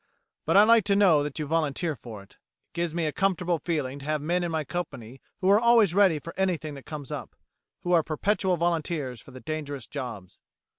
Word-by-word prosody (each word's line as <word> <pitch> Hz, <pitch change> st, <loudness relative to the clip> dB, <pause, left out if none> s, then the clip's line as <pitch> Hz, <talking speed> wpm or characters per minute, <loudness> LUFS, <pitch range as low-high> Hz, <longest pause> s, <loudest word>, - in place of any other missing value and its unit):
But -, -, +4 dB
I 205 Hz, -, +9 dB
like 230 Hz, 0 st, +5 dB
to 200 Hz, -, +2 dB
know 185 Hz, -7 st, +5 dB
that 145 Hz, -1 st, -4 dB
you 155 Hz, -, -2 dB
volunteer 155 Hz, +1 st, -1 dB
for 110 Hz, -5 st, -10 dB
it. 100 Hz, -, -22 dB, 0.4 s
It -, -, -57 dB
gives 170 Hz, -1 st, -2 dB
me 170 Hz, -2 st, 0 dB
a 155 Hz, -, 0 dB
comfortable 180 Hz, -2 st, 0 dB
feeling 145 Hz, -4 st, -2 dB
to 140 Hz, -, -11 dB
have 155 Hz, 0 st, 0 dB
men 175 Hz, +5 st, 0 dB
in 175 Hz, -, -1 dB
my 160 Hz, -1 st, -1 dB
company 135 Hz, -7 st, -6 dB, 0.2 s
who 185 Hz, -, +2 dB
are 205 Hz, -, +6 dB
always 230 Hz, -6 st, +4 dB
ready 190 Hz, -5 st, +4 dB
for 165 Hz, +3 st, -8 dB
anything 165 Hz, -6 st, -1 dB
that 140 Hz, -2 st, -11 dB
comes 145 Hz, -4 st, -7 dB
up, -, -, -6 dB, 0.5 s
who 175 Hz, -, -3 dB
are 170 Hz, -, +6 dB
perpetual 185 Hz, +4 st, 0 dB
volunteers 160 Hz, -7 st, -1 dB
for -, -, -16 dB
the 130 Hz, -1 st, -11 dB
dangerous 145 Hz, -4 st, -5 dB
jobs." 115 Hz, -10 st, -7 dB
160 Hz, 215 wpm, -27 LUFS, 145-180 Hz, 0.5 s, I